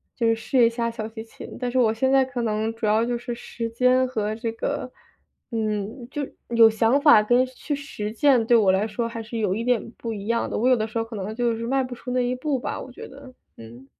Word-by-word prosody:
就 235 Hz, -, -1 dB
是 225 Hz, -, +4 dB
试 235 Hz, +2 st, +2 dB
一 -, -, +4 dB
下 235 Hz, 0 st, -2 dB
小 225 Hz, -2 st, -5 dB
提 220 Hz, 0 st, -8 dB
琴。 225 Hz, -, -11 dB
但 250 Hz, -1 st, -2 dB
是 250 Hz, -, -2 dB
我 225 Hz, -3 st, +3 dB
现 260 Hz, +4 st, +1 dB
在 270 Hz, 0 st, +5 dB
可 255 Hz, -2 st, -4 dB
能 220 Hz, 0 st, -1 dB
主 225 Hz, -, -4 dB
要 215 Hz, +2 st, +3 dB
就 240 Hz, 0 st, -1 dB
是 240 Hz, 0 st, -5 dB
时 230 Hz, -1 st, -5 dB
间 250 Hz, +2 st, +3 dB
和 215 Hz, -4 st, -2 dB
这 230 Hz, 0 st, -3 dB
个， 230 Hz, -, -3 dB, 0.6 s
嗯， 220 Hz, +2 st, -3 dB
就 285 Hz, +1 st, -3 dB, 0.2 s
有 230 Hz, -1 st, +7 dB
想 225 Hz, +5 st, +2 dB
法 290 Hz, -8 st, +7 dB
跟 245 Hz, +4 st, +3 dB
去 260 Hz, +3 st, -5 dB
实 275 Hz, -7 st, -5 dB
践， 250 Hz, -1 st, +3 dB
对 240 Hz, -, +4 dB
我 210 Hz, -5 st, +5 dB
来 195 Hz, +3 st, +1 dB
说 230 Hz, +2 st, -3 dB
还 230 Hz, 0 st, -6 dB
是 230 Hz, +1 st, -6 dB
有 205 Hz, -4 st, +1 dB
一 225 Hz, +4 st, -3 dB
点 245 Hz, -2 st, 0 dB
不 230 Hz, -1 st, -4 dB
一 200 Hz, -1 st, -7 dB
样 230 Hz, 0 st, 0 dB
的， -, -, -3 dB
我 245 Hz, +4 st, +2 dB
有 255 Hz, -, +5 dB
的 220 Hz, 0 st, -1 dB
时 220 Hz, -, -6 dB
候 225 Hz, -, +1 dB
可 225 Hz, +1 st, -11 dB
能 205 Hz, +2 st, -5 dB
就 240 Hz, -1 st, 0 dB
是 230 Hz, +1 st, -4 dB
迈 270 Hz, +1 st, +1 dB
不 250 Hz, -1 st, -6 dB
出 245 Hz, -, -9 dB
那 250 Hz, 0 st, +1 dB
一 245 Hz, 0 st, 0 dB
步 275 Hz, +2 st, -1 dB
吧， 245 Hz, -, -4 dB
我 -, -, -8 dB
觉 -, -, -10 dB
得， 270 Hz, -1 st, -13 dB, 0.2 s
嗯。 115 Hz, +3 st, -12 dB
230 Hz, 285 characters per minute, -24 LUFS, 220-250 Hz, 0.6 s, 有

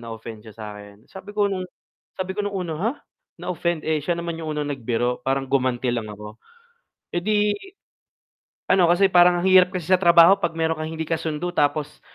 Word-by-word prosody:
na-offend 115 Hz, -1 st, -8 dB
siya 110 Hz, -1 st, -14 dB
sa 110 Hz, -, -8 dB
akin, 105 Hz, +1 st, -13 dB
sabi 200 Hz, +2 st, -12 dB
ko 205 Hz, -, +3 dB
nung 190 Hz, -2 st, -2 dB, 0.5 s
sabi 185 Hz, 0 st, -3 dB
ko 205 Hz, -, -3 dB
nung 205 Hz, -1 st, -3 dB
una 180 Hz, -3 st, -3 dB
"Ha? 225 Hz, +5 st, +1 dB, 0.4 s
Na-offend, 170 Hz, -2 st, -3 dB
eh, 155 Hz, -1 st, 0 dB
siya 170 Hz, +4 st, -1 dB
naman 170 Hz, -1 st, -5 dB
yung 160 Hz, -, -5 dB
unang 145 Hz, -1 st, -2 dB
nagbiro, 120 Hz, -1 st, -2 dB
parang 135 Hz, 0 st, -1 dB
gumanti 130 Hz, -2 st, 0 dB
lang 115 Hz, -3 st, -3 dB
ako." 105 Hz, +1 st, -10 dB, 0.7 s
Eh, -, -, -1 dB
'di 210 Hz, +3 st, +1 dB, 1.2 s
ano 180 Hz, -3 st, +4 dB
kasi 190 Hz, +2 st, +3 dB
parang 175 Hz, 0 st, +6 dB
ang 175 Hz, -, -2 dB
hirap 185 Hz, -1 st, +6 dB
kasi 185 Hz, -1 st, -1 dB
sa 185 Hz, -, +3 dB
trabaho 170 Hz, +2 st, +6 dB
'pag 165 Hz, -3 st, -2 dB
meron 160 Hz, 0 st, +1 dB
kang 155 Hz, 0 st, -4 dB
hindi 160 Hz, 0 st, -4 dB
kasundo 160 Hz, +2 st, -3 dB
tapos 150 Hz, -1 st, -1 dB
165 Hz, 195 wpm, -23 LUFS, 130-185 Hz, 1.2 s, parang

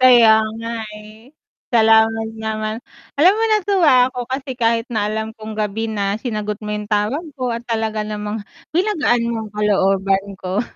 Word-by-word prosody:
Kaya 245 Hz, -3 st, +7 dB, 0.3 s
nga, 230 Hz, -, -5 dB, 0.3 s
eh. 215 Hz, +4 st, -15 dB, 0.4 s
Salamat 225 Hz, 0 st, +4 dB
naman. 215 Hz, 0 st, -3 dB, 0.4 s
Alam 350 Hz, +6 st, +7 dB
mo 445 Hz, -, -1 dB
natuwa 360 Hz, -12 st, +4 dB
ako 250 Hz, -1 st, -6 dB
kasi 265 Hz, 0 st, -3 dB
kahit 230 Hz, -1 st, +1 dB
na 210 Hz, -1 st, 0 dB
alam 220 Hz, +1 st, -3 dB
kong 215 Hz, 0 st, -8 dB
gabi 215 Hz, +1 st, -2 dB
na 200 Hz, -2 st, -1 dB
sinagot 210 Hz, -4 st, -3 dB
mo 210 Hz, -, -5 dB
'yong 210 Hz, 0 st, -3 dB
tawag 215 Hz, +10 st, 0 dB
ko 255 Hz, -2 st, -2 dB
at 235 Hz, 0 st, -5 dB
talaga 220 Hz, -2 st, -2 dB
namang 210 Hz, 0 st, -4 dB, 0.3 s
pinagaan 310 Hz, -, +1 dB
mo 235 Hz, -, -1 dB
ang -, -, -12 dB
kalooban 195 Hz, -1 st, +1 dB
ko. 190 Hz, +3 st, -1 dB
220 Hz, 160 wpm, -19 LUFS, 210-245 Hz, 0.4 s, Kaya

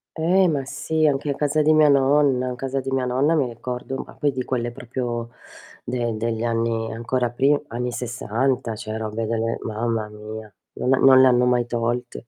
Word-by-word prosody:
Eh, 180 Hz, +4 st, +3 dB
ma 145 Hz, -5 st, 0 dB
sì, 155 Hz, +3 st, 0 dB
anche 145 Hz, 0 st, 0 dB
a -, -, -3 dB
casa 150 Hz, +2 st, +1 dB
di 155 Hz, +1 st, +4 dB
mia 155 Hz, -1 st, +5 dB
nonna. 135 Hz, -2 st, +3 dB
Casa 135 Hz, +2 st, -3 dB
di 135 Hz, 0 st, -4 dB
mia 130 Hz, -1 st, 0 dB
nonna, 130 Hz, +6 st, +2 dB
mi 145 Hz, -5 st, +2 dB
ricordo 125 Hz, +3 st, -5 dB
ma -, -, -14 dB
poi 145 Hz, -, 0 dB
di 130 Hz, -1 st, -3 dB
quelle 120 Hz, -2 st, -2 dB
proprio 120 Hz, -1 st, -4 dB, 0.5 s
de 120 Hz, -2 st, -2 dB
degli 115 Hz, +1 st, -2 dB
anni 115 Hz, -1 st, -1 dB
ancora 120 Hz, +1 st, -1 dB
pri 140 Hz, +4 st, +2 dB
anni 125 Hz, +1 st, -3 dB
'60, 120 Hz, 0 st, -2 dB
cioè, 110 Hz, 0 st, -6 dB
robe 110 Hz, 0 st, -3 dB
delle 115 Hz, +1 st, -1 dB
mamma 110 Hz, 0 st, -2 dB
mia, 105 Hz, 0 st, -9 dB, 0.2 s
non 130 Hz, -, 0 dB
ha -, -, +3 dB
non 130 Hz, -1 st, +7 dB
le 130 Hz, -, +7 dB
hanno 125 Hz, -1 st, +4 dB
mai 125 Hz, -1 st, +2 dB
tolte. 120 Hz, 0 st, -3 dB
125 Hz, 190 wpm, -23 LUFS, 115-135 Hz, 0.5 s, non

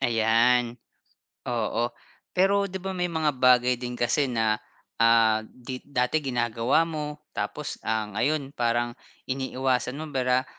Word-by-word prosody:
Ayan. 120 Hz, +1 st, +3 dB, 0.7 s
Oo. 120 Hz, 0 st, 0 dB, 0.5 s
Pero 200 Hz, +2 st, +3 dB
'di 190 Hz, -, -6 dB
ba, 190 Hz, 0 st, -3 dB
may 180 Hz, -1 st, -1 dB
mga 160 Hz, -3 st, 0 dB
bagay 125 Hz, -1 st, +5 dB
din 125 Hz, -1 st, -4 dB
kasi 120 Hz, +4 st, +1 dB
na, 110 Hz, -3 st, +1 dB, 0.4 s
ah, 115 Hz, -1 st, +5 dB
di 125 Hz, +1 st, -8 dB
dati 125 Hz, +2 st, 0 dB
ginagawa 120 Hz, +2 st, +1 dB
mo, 150 Hz, -2 st, -5 dB
tapos, 150 Hz, -1 st, -4 dB
ang 110 Hz, -1 st, -2 dB
ngayon 140 Hz, 0 st, 0 dB
parang 120 Hz, -2 st, 0 dB, 0.3 s
iniiwasan 130 Hz, -1 st, -1 dB
mo 155 Hz, -1 st, -7 dB
para, 130 Hz, -1 st, +1 dB
125 Hz, 130 wpm, -26 LUFS, 120-150 Hz, 0.7 s, bagay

